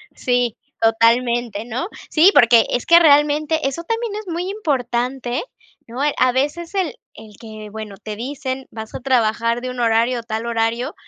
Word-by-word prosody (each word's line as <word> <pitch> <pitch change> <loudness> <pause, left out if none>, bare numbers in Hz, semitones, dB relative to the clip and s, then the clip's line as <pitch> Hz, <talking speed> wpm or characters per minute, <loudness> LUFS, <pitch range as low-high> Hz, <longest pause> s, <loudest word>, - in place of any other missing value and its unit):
Sí, 245 -2 0 0.2
totalmente, 230 -1 +2
¿no? 245 - -4 0.2
Sí, 335 +5 +5
porque 230 -1 +6
es 245 - -1
que 340 0 +7
realmente 300 0 +3
eso 335 +5 -4
también 455 +2 -3
es 425 -1 -7
muy 350 +2 -3
importante, 255 - -2
¿eh? - - -2 0.4
¿No? 240 +3 -8 0.2
A 255 - +3
veces 295 +8 -2
el 370 -6 -1 0.2
el 215 -1 -13
que, 215 -2 -9
bueno, 215 -2 -8
te 215 0 -7
dicen: 260 +2 -5
"Vas 220 -1 -8
a - - -4
trabajar 230 -2 +1
de 255 - -5
un 250 - -7
horario, 235 +1 +2
tal 225 0 -4
horario", 235 +5 -1
245 Hz, 170 wpm, -20 LUFS, 230-295 Hz, 0.4 s, que